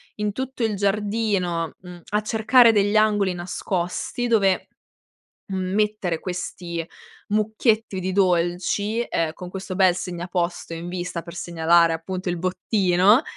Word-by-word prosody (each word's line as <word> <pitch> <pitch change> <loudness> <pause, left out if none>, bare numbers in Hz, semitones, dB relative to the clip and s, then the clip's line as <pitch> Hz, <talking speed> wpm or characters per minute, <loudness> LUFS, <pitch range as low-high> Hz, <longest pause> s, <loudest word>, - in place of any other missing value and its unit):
in 210 0 -1
tutto 260 +2 -4
il 220 -2 +1
giardino, 200 -4 0
mhmm, 180 -1 -11
a 210 +1 +1
cercare 225 +2 +5
degli 205 0 +2
angoli 205 -3 +3
nascosti 180 +6 -3
dove, 200 -5 +2 0.8
mhmm, 185 -1 -3
mettere 210 -6 0
questi 175 -2 -5 0.4
mucchietti 215 -1 +1
di 185 +1 -2
dolci, 185 +4 +1
ehm, 165 -8 -1
con 180 +2 -9
questo 190 0 -6
bel 185 -2 +5
segnaposto 175 -1 -3
in 170 +1 -6
vista 175 -1 -4
per 170 0 -10
segnalare 170 -1 +3
appunto 185 +3 -4
il 175 - -1
bottino 185 - +3
185 Hz, 130 wpm, -23 LUFS, 175-210 Hz, 0.8 s, cercare